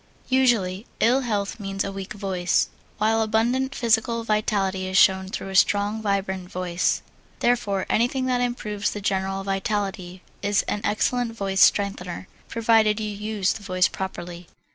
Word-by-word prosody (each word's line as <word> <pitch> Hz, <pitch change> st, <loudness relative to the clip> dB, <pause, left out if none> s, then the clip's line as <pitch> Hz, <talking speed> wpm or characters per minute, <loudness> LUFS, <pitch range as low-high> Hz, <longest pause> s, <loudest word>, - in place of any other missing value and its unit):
Usually, 230 Hz, -7 st, +2 dB
ill 245 Hz, +4 st, +4 dB
health 210 Hz, -3 st, -2 dB
means 195 Hz, -1 st, -3 dB
a 195 Hz, -, -4 dB
weak 195 Hz, +1 st, -6 dB
voice, 190 Hz, -4 st, 0 dB, 0.3 s
while 220 Hz, +1 st, +2 dB
abundant 240 Hz, +5 st, +1 dB
physical 230 Hz, 0 st, +1 dB
vitality 200 Hz, -3 st, 0 dB
is 185 Hz, 0 st, 0 dB
shown 190 Hz, -1 st, +5 dB
through 195 Hz, -, -5 dB
a 190 Hz, -, -6 dB
strong, 205 Hz, +3 st, +3 dB
vibrant 190 Hz, -3 st, -2 dB
voice. 180 Hz, -2 st, -1 dB, 0.4 s
Therefore 205 Hz, -6 st, +1 dB
anything 245 Hz, +3 st, +1 dB
that 250 Hz, -1 st, +1 dB
improves 210 Hz, -4 st, -2 dB
the 210 Hz, -, -5 dB
general 195 Hz, 0 st, -1 dB
vitality 195 Hz, -2 st, -3 dB, 0.2 s
is 205 Hz, 0 st, +1 dB
an 205 Hz, -, -3 dB
excellent 230 Hz, +3 st, 0 dB
voice 195 Hz, -3 st, -1 dB
strengthener, 190 Hz, -3 st, +2 dB, 0.2 s
provided 225 Hz, -2 st, +3 dB
you 215 Hz, -1 st, -3 dB
use 210 Hz, -1 st, -1 dB
the -, -, -9 dB
voice 185 Hz, -2 st, +2 dB
properly. 175 Hz, -2 st, -6 dB
205 Hz, 145 wpm, -24 LUFS, 190-225 Hz, 0.4 s, shown